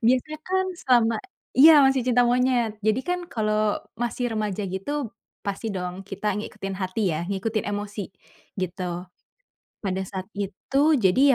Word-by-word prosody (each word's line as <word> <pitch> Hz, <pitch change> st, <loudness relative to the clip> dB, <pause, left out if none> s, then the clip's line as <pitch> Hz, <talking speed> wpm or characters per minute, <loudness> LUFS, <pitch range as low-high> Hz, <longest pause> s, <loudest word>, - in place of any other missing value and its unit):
Biasanya 260 Hz, +5 st, +2 dB
kan, 375 Hz, 0 st, +1 dB, 0.2 s
selama 235 Hz, -3 st, +4 dB, 0.4 s
iya 315 Hz, +5 st, +10 dB
masih 270 Hz, 0 st, +4 dB
cinta 245 Hz, -1 st, +3 dB
monyet. 245 Hz, -3 st, +2 dB
Jadi, 215 Hz, +3 st, +3 dB
kan 360 Hz, 0 st, 0 dB
kalo 215 Hz, -3 st, +1 dB, 0.2 s
masih 240 Hz, +1 st, -2 dB
remaja 210 Hz, -2 st, -1 dB
gitu, 230 Hz, +8 st, -3 dB, 0.4 s
pasti 200 Hz, +3 st, -3 dB
dong 180 Hz, +1 st, -4 dB
kita 195 Hz, +2 st, -6 dB
ngikutin 200 Hz, -2 st, -5 dB
hati 185 Hz, +2 st, -3 dB, 0.2 s
ya, 170 Hz, -, -3 dB
ngikutin 210 Hz, +3 st, -1 dB
emosi, 205 Hz, -1 st, -4 dB, 0.5 s
gitu. 180 Hz, 0 st, -4 dB, 0.8 s
Pada 190 Hz, -1 st, -1 dB
saat 190 Hz, -1 st, -5 dB
itu, 205 Hz, +7 st, -1 dB, 0.2 s
jadi 200 Hz, +1 st, +3 dB
215 Hz, 135 wpm, -25 LUFS, 195-250 Hz, 0.8 s, iya